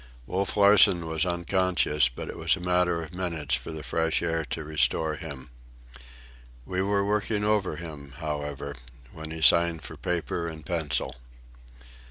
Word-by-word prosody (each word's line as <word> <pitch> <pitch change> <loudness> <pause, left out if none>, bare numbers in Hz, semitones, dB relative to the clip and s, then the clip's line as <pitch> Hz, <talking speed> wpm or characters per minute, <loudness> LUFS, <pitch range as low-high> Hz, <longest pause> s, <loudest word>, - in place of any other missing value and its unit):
Wolf 95 +7 -2
Larsen 100 -4 +6
was 80 +2 0
unconscious, 85 -5 +2
but - - -7
it - - -6
was - - +2
a - - -9
matter 90 -1 +1
of 80 +2 -10
minutes 85 -6 -3
for 65 +4 -1
the 80 -1 -6
fresh 80 0 0
air 80 -1 0
to 80 +5 -4
restore 80 +1 +1
him. 70 -7 -8 1.1
We 90 0 -1
were 100 0 +1
working 105 0 0
over 105 -2 +1
him, 75 -5 -9
however, 75 -3 -4 0.4
when 80 0 -8
he 80 0 -5
signed 85 -1 +5
for - - -8
paper 85 -1 -2
and 80 -2 -8
pencil. 80 -5 -1
80 Hz, 155 wpm, -27 LUFS, 75-90 Hz, 1.1 s, Larsen